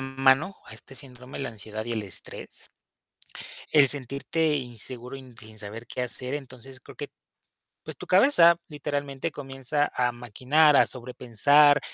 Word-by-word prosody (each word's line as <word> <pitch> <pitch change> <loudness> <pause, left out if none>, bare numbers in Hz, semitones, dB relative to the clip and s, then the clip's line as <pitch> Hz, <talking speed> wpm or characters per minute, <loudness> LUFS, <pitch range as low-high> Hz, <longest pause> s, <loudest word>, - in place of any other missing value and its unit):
mano 135 +6 +1
a - - -12
este 125 +4 -10
síndrome, 130 -1 -8
la 135 - -4
ansiedad 110 0 -4
y 120 - -4
el 110 -2 -2
estrés, 95 -3 -3 1.0
el 145 -2 +7
sentirte 145 +4 +1
inseguro 125 0 -2
y 135 - -9
n 130 -1 -16
sin 110 0 -12
saber 110 +3 -8
qué 125 - -5
hacer, 125 +1 -3
entonces, 130 -2 -8
creo - - -15
que, - - -6 0.8
pues, - - -8
tu - - -10
cabeza, 180 -5 +5
literalmente, 145 -1 -4
comienza 140 0 -2
a 125 -1 0
maquinar, 130 +6 +2
a - - +5
sobrepensar, 130 +4 +3
135 Hz, 150 wpm, -26 LUFS, 120-145 Hz, 1.0 s, el